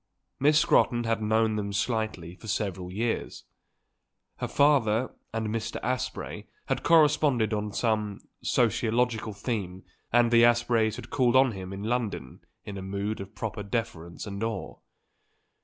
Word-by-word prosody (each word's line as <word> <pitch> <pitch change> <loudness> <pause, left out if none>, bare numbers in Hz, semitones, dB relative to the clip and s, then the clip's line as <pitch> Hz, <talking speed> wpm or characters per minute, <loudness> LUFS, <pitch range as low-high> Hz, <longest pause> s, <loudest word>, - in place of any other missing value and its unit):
Miss 150 +2 +4
Scrotton 120 -5 +3
had 115 -1 0
known 110 0 +2
them 100 -1 -2
slightly 100 -4 -2
for 105 +5 -13
several 95 -4 -2
years; 115 +4 -2 0.9
her - - -3
father 130 -5 +3 0.2
and 110 -1 -2
Mr. 110 0 -3
Asprey 125 +2 -3 0.2
had - - -1
corresponded 150 -8 +4
on 105 0 -2
some 105 -3 -1 0.2
sociological 115 -1 +1
theme 100 -4 -4 0.3
and 120 0 +4
the 115 -1 +6
Aspreys 120 -2 +3
had - - -10
called 125 -2 +2
on 130 -1 +6
him 95 -2 -7
in 95 +1 -6
London 110 - -2 0.3
in 100 -2 -6
a - - -6
mood 100 +2 -3
of 95 +2 -10
proper 105 +1 -4
deference 100 -6 -4
and 100 0 -5
awe. 110 -4 -3
110 Hz, 140 wpm, -28 LUFS, 100-120 Hz, 0.9 s, the